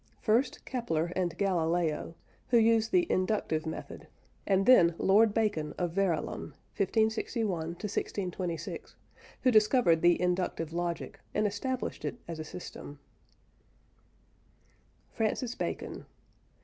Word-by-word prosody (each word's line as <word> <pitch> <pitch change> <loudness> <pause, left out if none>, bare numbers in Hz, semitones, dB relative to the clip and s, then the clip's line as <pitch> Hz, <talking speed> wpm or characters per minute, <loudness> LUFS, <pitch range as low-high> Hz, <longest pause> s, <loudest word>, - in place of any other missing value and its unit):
First, 235 +4 +1
Kepler 175 -10 -1
and 180 -3 -1
Galileo, 170 -4 0 0.3
who 240 - +4
used 225 -1 +3
the 360 -2 +4
"inductive" 185 -5 0
method, 160 - -7 0.4
and 195 -1 +3
then 170 -10 +6
Lord 210 +3 +4
Bacon 205 -9 -1
of 175 -2 -1
Verulam 180 -3 -1 0.2
(1561 220 +2 +1 0.2
1626), 180 -4 -4 0.5
who 255 - +5
discovered 215 -6 +4
the 175 0 +4
inductive 180 -2 -1
logic, 170 -1 -3 0.2
and 210 - +2
established 250 +5 -3
it - - -3
as 165 -1 -6
a - - -3
system. 150 -3 -9 2.1
FRANCIS 230 +2 -1
BACON. - - -5
190 Hz, 110 wpm, -30 LUFS, 170-220 Hz, 2.1 s, then